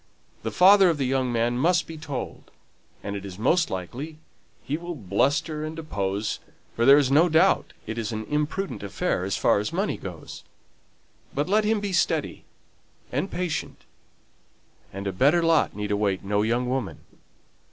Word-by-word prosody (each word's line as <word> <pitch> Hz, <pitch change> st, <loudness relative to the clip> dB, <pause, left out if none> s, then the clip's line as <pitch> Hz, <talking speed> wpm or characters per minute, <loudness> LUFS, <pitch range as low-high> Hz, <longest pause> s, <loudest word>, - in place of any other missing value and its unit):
The -, -, -3 dB
father 190 Hz, 0 st, +6 dB
of 165 Hz, -, 0 dB
the 135 Hz, -, 0 dB
young 130 Hz, -1 st, 0 dB
man 120 Hz, +1 st, 0 dB
must 175 Hz, +5 st, +3 dB
be 165 Hz, -, -8 dB
told, 150 Hz, -4 st, -6 dB, 0.5 s
and 100 Hz, 0 st, -4 dB
it 100 Hz, -, -5 dB
is 95 Hz, -2 st, -8 dB
most 165 Hz, -, +2 dB
likely 125 Hz, -, -6 dB, 0.5 s
he 145 Hz, -, -2 dB
will 170 Hz, +2 st, -5 dB
bluster 140 Hz, -, 0 dB
and 155 Hz, +1 st, -5 dB
oppose; 105 Hz, -9 st, -2 dB, 0.4 s
for 115 Hz, -, +1 dB
there 140 Hz, +2 st, +8 dB
is 140 Hz, -3 st, +2 dB
no 160 Hz, +5 st, +5 dB
doubt 165 Hz, +5 st, +3 dB
it 110 Hz, +1 st, -4 dB
is 115 Hz, +1 st, -3 dB
an 110 Hz, 0 st, -4 dB
imprudent 150 Hz, -, -2 dB
affair 100 Hz, -, -2 dB
as 95 Hz, +1 st, -1 dB
far -, -, +3 dB
as 105 Hz, -, -3 dB
money 195 Hz, +5 st, -1 dB
goes. 90 Hz, -5 st, -9 dB, 0.9 s
But 145 Hz, +3 st, 0 dB
let 210 Hz, +3 st, +2 dB
them 215 Hz, 0 st, +2 dB
be 200 Hz, -2 st, -3 dB
steady -, -, 0 dB, 0.7 s
and 195 Hz, -, -1 dB
patient, 180 Hz, -2 st, -4 dB, 1.1 s
and 100 Hz, +1 st, -7 dB
a 100 Hz, -, -1 dB
better 145 Hz, -, +3 dB
lot 165 Hz, -8 st, +3 dB
need 105 Hz, 0 st, -3 dB
await 100 Hz, -2 st, 0 dB
no 100 Hz, +1 st, 0 dB
young 120 Hz, +3 st, 0 dB
woman. 125 Hz, -5 st, -3 dB
135 Hz, 170 wpm, -25 LUFS, 105-165 Hz, 1.1 s, there